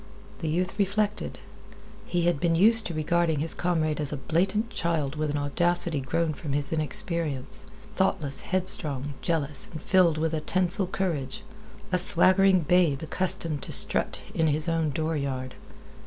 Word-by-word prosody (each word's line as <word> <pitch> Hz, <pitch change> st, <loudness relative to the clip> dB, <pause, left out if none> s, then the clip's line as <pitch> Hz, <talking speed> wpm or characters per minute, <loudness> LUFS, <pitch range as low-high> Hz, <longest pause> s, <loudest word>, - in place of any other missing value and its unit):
The 160 Hz, -, -4 dB
youth 180 Hz, +5 st, -2 dB
reflected. 205 Hz, +1 st, -1 dB, 0.7 s
He 175 Hz, -1 st, -1 dB
had 175 Hz, -4 st, +1 dB
been 165 Hz, +1 st, +1 dB
used 225 Hz, +5 st, +4 dB
to 175 Hz, -, -6 dB
regarding 160 Hz, +1 st, 0 dB
his 160 Hz, +3 st, -2 dB
comrade 160 Hz, -4 st, -1 dB
as 145 Hz, -, -1 dB
a 150 Hz, -, -4 dB
blatant 190 Hz, -, -1 dB
child 155 Hz, -5 st, -2 dB
with 155 Hz, 0 st, -2 dB
an 145 Hz, -, -2 dB
audacity 170 Hz, +2 st, +1 dB
grown 160 Hz, +4 st, -2 dB
from 145 Hz, -1 st, -6 dB
his 145 Hz, +2 st, -1 dB
inexperience, 155 Hz, -2 st, -3 dB, 0.3 s
thoughtless, 160 Hz, -8 st, +3 dB
headstrong, 150 Hz, -7 st, -1 dB
jealous, 150 Hz, -4 st, -2 dB
and 155 Hz, -, -7 dB
filled 175 Hz, -2 st, +2 dB
with 160 Hz, +1 st, -1 dB
a 155 Hz, -, -2 dB
tinsel 185 Hz, +3 st, -1 dB
courage. 185 Hz, +1 st, -4 dB, 0.5 s
A 180 Hz, -, +1 dB
swaggering 185 Hz, +1 st, +6 dB
babe 160 Hz, -3 st, +1 dB
accustomed 170 Hz, -3 st, +1 dB
to -, -, -7 dB
strut -, -, -1 dB
in 160 Hz, -, +1 dB
his 155 Hz, +2 st, 0 dB
own 165 Hz, -2 st, 0 dB
dooryard. 140 Hz, -4 st, -3 dB
165 Hz, 155 wpm, -26 LUFS, 150-180 Hz, 0.7 s, swaggering